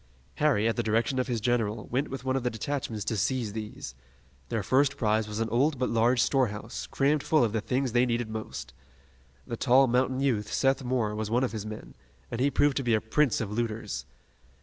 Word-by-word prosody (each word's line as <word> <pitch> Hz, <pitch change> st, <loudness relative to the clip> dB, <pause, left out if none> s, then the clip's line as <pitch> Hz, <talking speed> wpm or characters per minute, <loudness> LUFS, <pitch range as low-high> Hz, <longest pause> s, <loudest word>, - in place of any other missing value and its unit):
Harry, 135 Hz, -8 st, +3 dB
at 115 Hz, -, +1 dB
the 120 Hz, -, 0 dB
direction 115 Hz, +4 st, +1 dB
of 125 Hz, -, 0 dB
his 120 Hz, -3 st, -1 dB
general, 115 Hz, -2 st, 0 dB
went 135 Hz, +4 st, 0 dB
with 135 Hz, -1 st, -6 dB
one 130 Hz, 0 st, +1 dB
of 135 Hz, -, 0 dB
the 125 Hz, -, 0 dB
detachments 110 Hz, -3 st, -4 dB
to 110 Hz, -, -1 dB
seize 115 Hz, -1 st, -1 dB
these. 105 Hz, -, -6 dB, 0.6 s
Their 110 Hz, -3 st, -1 dB
first 140 Hz, +6 st, +2 dB
prize 110 Hz, -3 st, +1 dB
was 105 Hz, 0 st, -5 dB
an 115 Hz, -, 0 dB
old 135 Hz, +6 st, +2 dB
but 125 Hz, 0 st, -1 dB
large 115 Hz, +2 st, +3 dB
storehouse, 105 Hz, -, -1 dB
crammed 140 Hz, -, +1 dB
full 155 Hz, 0 st, +3 dB
of 110 Hz, -3 st, 0 dB
the 110 Hz, -, 0 dB
things 130 Hz, +2 st, -1 dB
they 120 Hz, +2 st, +3 dB
needed 120 Hz, -1 st, -1 dB
most. 70 Hz, -, -6 dB, 0.7 s
The 115 Hz, -, -5 dB
tall 130 Hz, +2 st, +5 dB
mountain 130 Hz, +1 st, +1 dB
youth, 120 Hz, -7 st, 0 dB
Seth 135 Hz, 0 st, +2 dB
Moore, 120 Hz, -4 st, 0 dB
was 105 Hz, 0 st, -3 dB
one 120 Hz, +3 st, +2 dB
of 130 Hz, -, 0 dB
his 110 Hz, -1 st, -5 dB
men, 110 Hz, 0 st, -8 dB, 0.4 s
and 115 Hz, -, -2 dB
he 140 Hz, -, +4 dB
proved 145 Hz, 0 st, +2 dB
to 135 Hz, -, 0 dB
be 120 Hz, -2 st, +3 dB
a -, -, +2 dB
prince 125 Hz, +4 st, +1 dB
of 105 Hz, -3 st, -3 dB
looters. 110 Hz, -1 st, -3 dB
120 Hz, 215 wpm, -28 LUFS, 110-130 Hz, 0.7 s, tall